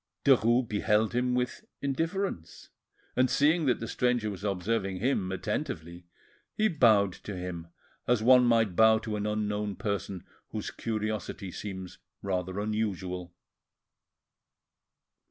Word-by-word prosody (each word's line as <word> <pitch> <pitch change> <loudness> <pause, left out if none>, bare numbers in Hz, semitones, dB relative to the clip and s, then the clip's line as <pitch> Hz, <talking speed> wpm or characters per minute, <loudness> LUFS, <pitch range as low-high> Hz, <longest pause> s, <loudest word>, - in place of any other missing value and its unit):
Derues 120 -2 +4
beheld 105 +1 +1
him 125 +1 +1
with 125 0 -2 0.2
indifference, 160 - -3 0.5
and 130 0 +3
seeing 155 +2 +3
that 125 - +2
the 115 - -4
stranger 120 -2 0
was 95 0 -8
observing 100 0 -1
him 100 -4 0
attentively, 90 - -4 0.5
he 215 - +3
bowed 110 - +4
to 105 - -8
him 90 -2 -5 0.4
as 120 -3 +2
one 125 +1 +7
might 115 -6 +3
bow 110 +1 +6
to 110 -1 -4
an 105 0 -2
unknown 105 -1 -1
person 100 -2 -3 0.2
whose - - -4
curiosity 110 -3 -3
seems 95 -2 -7 0.2
rather 95 0 -2
unusual. 95 -5 -3
105 Hz, 120 wpm, -29 LUFS, 95-125 Hz, 0.5 s, one